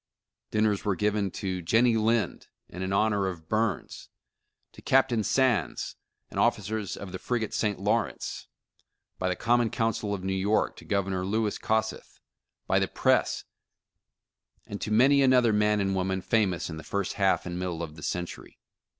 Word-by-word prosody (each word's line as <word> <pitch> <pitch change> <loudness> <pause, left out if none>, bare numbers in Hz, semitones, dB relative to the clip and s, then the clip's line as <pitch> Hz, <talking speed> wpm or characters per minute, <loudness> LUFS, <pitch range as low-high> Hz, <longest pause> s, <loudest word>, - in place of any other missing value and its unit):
Dinners 105 -2 +1
were 100 -3 +1
given 105 -1 0
to 95 -1 -4
Jennie 115 +7 +3
Lind 110 0 0 0.2
and 90 +2 -5
in 95 - -2
honor 100 -1 +2
of 85 -4 -6
Burns; 110 -3 -2 0.6
to - - -14
Captain 130 -4 +3
Sands 120 - +1 0.4
and - - -4
the - - +4
officers 105 0 0
of 100 -2 -8
the 95 - -6
frigate 115 0 -2
St. 105 -2 0
Lawrence, 105 +1 -1 0.7
by 95 - 0
the 90 - 0
Common 120 +1 +2
Council 115 -3 -1
of 95 - -8
New 95 0 -1
York, 100 +3 +1
to - - -12
Governor 95 -2 -1
Louis 105 +2 -1
Kossuth, 110 0 -2 0.5
by - - +2
the - - +1
Press; - - +1 1.2
and 100 - -7
to - - -3
many 135 +6 +5
another 125 -4 +4
man 105 0 +3
and 95 -1 0
woman 95 0 -1
famous 95 -7 +1
in 80 - -6
the 80 - -8
first 100 -1 -2
half 95 -1 +3
and 90 0 -4
middle 90 -2 -3
of 75 -2 -7
the 75 - -12
century. 90 +3 -5
105 Hz, 165 wpm, -28 LUFS, 95-110 Hz, 1.2 s, many